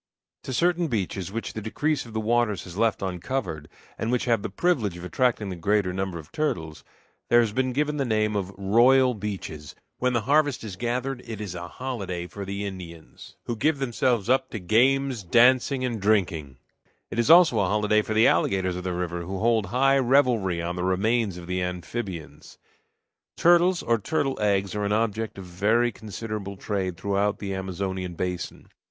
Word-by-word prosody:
To - - -4
certain 170 +5 +2
beaches 95 - -3
which 115 +2 -4
the 110 - -5
decrease 135 +5 -1
of 115 - -12
the 110 - -1
waters 110 -2 +1
has 90 -2 -10
left 110 -1 +1
uncovered, 90 - -3 0.3
and 110 - -1
which 125 - 0
have 115 -4 +2
the - - -4
privilege 110 - 0
of 85 - -9
attracting 115 0 0
the 95 - -4
greater 95 +2 +1
number 95 -2 -3
of 75 -2 -11
turtles, 85 - -3 0.5
there 120 - +6
has 115 -3 +2
been 130 +2 0
given 150 +3 0
the 140 - +1
name 110 -3 0
of 100 -1 -2
"royal 125 +6 +4
beaches." 95 -8 -6 0.2
When 125 0 +1
the 120 - +1
harvest 145 +2 +2
is 105 -4 -6
gathered 125 +4 -2
it 110 -3 -6
is 100 -4 -5
a 85 -1 -6
holiday 100 -7 -5
for 100 +3 -7
the 100 +1 -4
Indians, 90 -4 -9
who 120 - -2
give 150 +7 +1
themselves 120 -4 0
up 130 +1 +2
to - - -5
games, 130 +6 +2
dancing, 130 +6 +4
and 115 -4 -3
drinking; 95 -7 +2
and 65 -2 -20 0.5
it - - -3
is 115 - +1
also 165 -9 +7
a 100 - +2
holiday 105 +2 +2
for 110 0 -4
the 110 +2 +5
alligators 95 +1 +2
of 90 - -5
the 90 -1 -2
river, 85 -1 -3
who 95 +3 -5
hold 110 -1 +2
high 135 +5 +3
revelry 120 -10 +2
on 85 +1 -3
the 90 - -2
remains 100 +2 +1
of 90 - -9
the 90 +1 -2
amphibians. 90 0 -6 0.8
Turtles, 175 +1 +4
or 115 -1 +2
turtle 135 +3 -1
eggs, 100 -2 +1
are 105 0 -2
an 100 0 0
object 110 0 -1
of 95 - -8
very 110 +7 +1
considerable 105 -2 -6
trade 95 -4 -3
throughout 100 0 0
the 100 -1 -4
Amazonian 95 -1 -4
basin. 90 -1 -4
105 Hz, 190 wpm, -25 LUFS, 95-120 Hz, 0.8 s, also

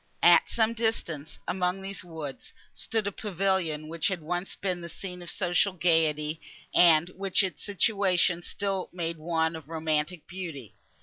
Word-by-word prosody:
At - - +7
some 225 0 +2
distance, 170 -10 -1
among 180 0 0
these 195 -1 -4
woods, 160 -6 -7 0.2
stood 225 -2 -1
a 200 - -1
pavilion, 190 -6 -1
which 165 0 -1
had 190 -3 0
once 175 +4 -3
been 185 -3 -2
the 170 - -7
scene 180 0 -7
of 175 - -6
social 185 +1 +1
gaiety, 160 -3 +2 0.3
and 170 -1 +6
which 195 +1 +1
its 190 - -4
situation 190 -4 +2
still 195 +1 -3
made 170 -2 -3
one 160 0 0
of 160 -2 -10
romantic 160 +1 -1
beauty. 160 - -7
175 Hz, 150 wpm, -28 LUFS, 160-190 Hz, 0.3 s, At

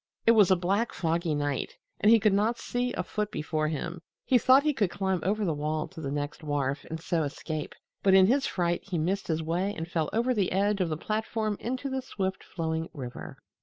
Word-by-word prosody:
It 230 - +7
was 210 -5 +6
a 185 - +6
black, 195 +6 0
foggy 165 -1 0
night, 145 -2 -2 0.2
and 210 - +5
he 230 - +7
could 215 -1 +3
not 215 +4 +2
see 245 +1 -2
a 180 - -2
foot 210 +3 -2
before 155 -4 -1
him. 165 +3 -4 0.2
He 250 - +4
thought 260 +4 +6
he 300 -1 +2
could 210 -8 +1
climb 190 -1 -1
over 205 +5 0
the 165 - +1
wall 155 +1 -2
to 160 - -9
the 140 - -3
next 145 +1 -3
wharf 145 -2 -1
and 160 0 -5
so 165 0 0
escape, 155 +1 -4 0.3
but 190 -1 +5
in 190 -1 +8
his 270 +6 +2
fright 175 -2 0
he 190 -3 -3
missed 185 +5 -1
his 160 -1 -1
way 180 +6 -1
and 165 - -4
fell 160 -3 -1
over 240 +3 +1
the 200 -6 0
edge 200 +1 +2
of 175 - +1
the 155 - -2
platform 215 +2 -2
into 255 +3 -3
the 265 -1 -2
swift 190 -7 -3
flowing 160 -1 -3
river. 125 -4 -7
185 Hz, 225 wpm, -28 LUFS, 160-215 Hz, 0.3 s, in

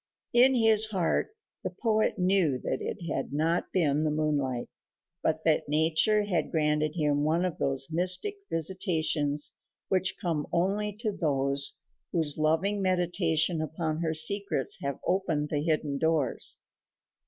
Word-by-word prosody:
In 255 +2 +5
his 220 -2 +4
heart 190 -6 0 0.3
the - - -2
poet 220 -2 0
knew 180 -7 +2
that - - -2
it - - -4 0.2
had 135 - -3
not 160 +4 -1
been 155 -5 +1
the 155 - +1
moonlight, 145 -5 -1 0.5
but 160 0 -1
that 155 -2 +1
nature 160 +8 +2
had 180 -6 -1
granted 150 -1 0
him 145 -3 +1
one 165 +4 +1
of 180 - -4
those 135 -1 0
mystic 185 - +2
visitations 160 -4 +1 0.3
which 185 -1 +1
come 160 -4 -2
only 200 +4 -1
to 220 -3 -1
those 140 -6 +1 0.4
whose 160 -4 +2
loving 165 +7 +1
meditation 175 -3 +1
upon 155 0 -3
her 160 -1 -1
secrets 180 -2 +2
have 140 -1 -3
opened 165 -6 0
the 145 - -1
hidden 150 -3 -1
doors. 160 -5 0
160 Hz, 140 wpm, -28 LUFS, 150-185 Hz, 0.5 s, In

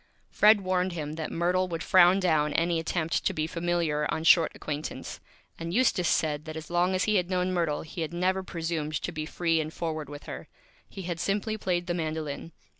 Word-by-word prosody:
Fred 210 0 +6
warned 185 -1 0
him 150 -3 -4
that 160 0 -5
Myrtle 180 +2 +1
would 165 -2 -4
frown 185 +1 +6
down 155 -5 +2
any 170 0 +1
Attempt 165 0 -1
to - - +1
be 155 - -1
Familiar 165 -3 -1
on 160 - -2
Short 165 0 +6
Acquaintance, 150 0 -5 0.4
and 165 +2 -4
Eustace 220 -8 +3
said 150 -1 +1
that 155 0 -6
as 160 +1 -8
long 175 +2 +2
as 185 - +1
he 215 -1 +2
had 180 -1 0
known 185 0 0
Myrtle 165 -4 0
he 160 +2 -7
had 160 - -2
never 185 +2 0
Presumed 165 -4 -3
to - - -4
be 155 0 -4
Free 165 -2 +1
and 155 0 -5
Forward 155 -4 -4
with 145 0 -9
her. - - -8 0.4
He 195 - -8
had 170 -1 -4
simply 205 +5 -1
played 180 -4 -1
the 175 - -1
Mandolin. 160 -2 -4
170 Hz, 205 wpm, -28 LUFS, 155-180 Hz, 0.4 s, Fred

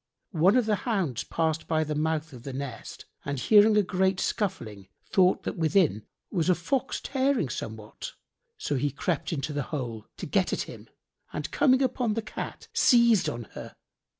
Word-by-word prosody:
One 185 +8 +4
of 250 - +3
the 215 -1 +1
hounds 185 - -1
passed 160 -1 -1
by 155 -1 +2
the 155 0 -3
mouth 155 0 -1
of 125 - -10
the 135 +2 -7
nest 130 -4 -7 0.2
and 140 0 -3
hearing 210 - +6
a 210 - +5
great 190 0 +1
scuffling, 115 - -2 0.2
thought 185 -1 +3
that - - -4
within 160 - +2 0.2
was 175 -2 0
a 180 - +5
fox 260 +10 -1
tearing 270 - 0
somewhat; 110 -1 -6 0.4
so 150 - -2
he 145 +3 +1
crept 145 +5 -2
into 150 -1 -2
the 145 - -1
hole, 120 -7 -4
to - - -5
get - - +1
at - - 0
him, - - -11 0.4
and 150 - -4
coming 260 0 +4
upon 245 -4 0
the 225 - -2
Cat, 215 - -7
seized 235 -5 +5
on 120 0 -5
her. - - -9
165 Hz, 180 wpm, -27 LUFS, 140-210 Hz, 0.4 s, hearing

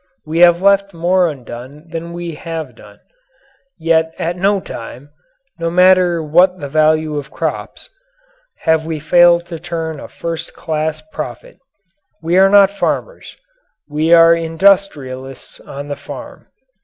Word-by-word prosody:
We 160 +2 -2
have 175 +1 +5
left 200 -1 +3
more 175 +1 +2
undone 130 +3 -10
than 165 +1 -6
we 170 -1 -6
have 165 +1 -6
done. - - -17 0.8
Yet 160 -1 +1
at 170 +1 -2
no 195 +2 +1
time 130 -2 -10 0.5
no 165 0 -1
matter 180 -1 +4
what 180 +4 +3
the 145 - -5
value 155 0 +1
of 145 -1 -6
crops - - -5 0.7
have 160 -1 +2
we 160 -1 -4
failed 170 +2 +4
to 170 -2 -8
turn 165 -3 -5
a - - -9
first 165 0 -6
class 155 -1 -3
profit. - - -7 0.6
We 165 +2 -1
are 195 0 +6
not 200 -1 +6
farmers 205 - -4 0.5
we 155 +2 -1
are 165 0 +7
industrialists 160 -6 -1
on 140 +1 -9
the 145 - -4
farm. - - -10
165 Hz, 140 wpm, -16 LUFS, 155-175 Hz, 0.8 s, are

